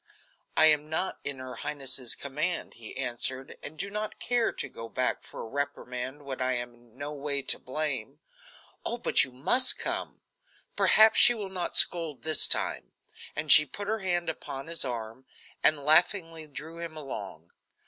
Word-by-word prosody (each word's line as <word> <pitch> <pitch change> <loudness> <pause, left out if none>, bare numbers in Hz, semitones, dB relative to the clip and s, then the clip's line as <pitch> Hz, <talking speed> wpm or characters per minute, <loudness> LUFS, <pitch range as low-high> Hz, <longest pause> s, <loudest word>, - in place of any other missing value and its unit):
"I 160 - +7
am 150 -1 +4
not 160 +4 -2
in 140 -1 -2
her 130 -1 -8
highness's 130 -4 -1
command," 155 +5 -3
he 115 0 -11
answered, 130 +1 -3
"and 155 - -9
do 200 +5 -4
not 210 +1 -5
care 240 -1 +1
to - - -5
go 115 0 -9
back 125 +2 -1
for - - -10
a - - -7
reprimand 135 0 -5
when 130 -2 -5
I 130 0 +1
am 120 0 -4
in 120 0 -24
no 145 +2 -5
way 140 -1 -3
to - - 0
blame." 135 -2 -4 0.7
"Oh, 235 - -3
but - - +4
you 130 - -6
must 145 - +4
come; - - -3 0.5
perhaps 220 +1 +5
she 240 - +8
will 205 -4 -5
not 180 -2 -3
scold 165 -5 +5
this 155 -1 +3
time," - - -1 0.4
and 150 0 +1
she 150 - +10
put 200 +7 -8
her 220 +1 -1
hand 175 -3 -1
upon 135 -4 -5
his 165 0 -1
arm, 120 0 -6 0.4
and 155 -2 +5
laughingly 165 0 +3
drew 160 +3 -9
him 165 -2 -7
along. 95 - -8
145 Hz, 175 wpm, -28 LUFS, 130-165 Hz, 0.7 s, she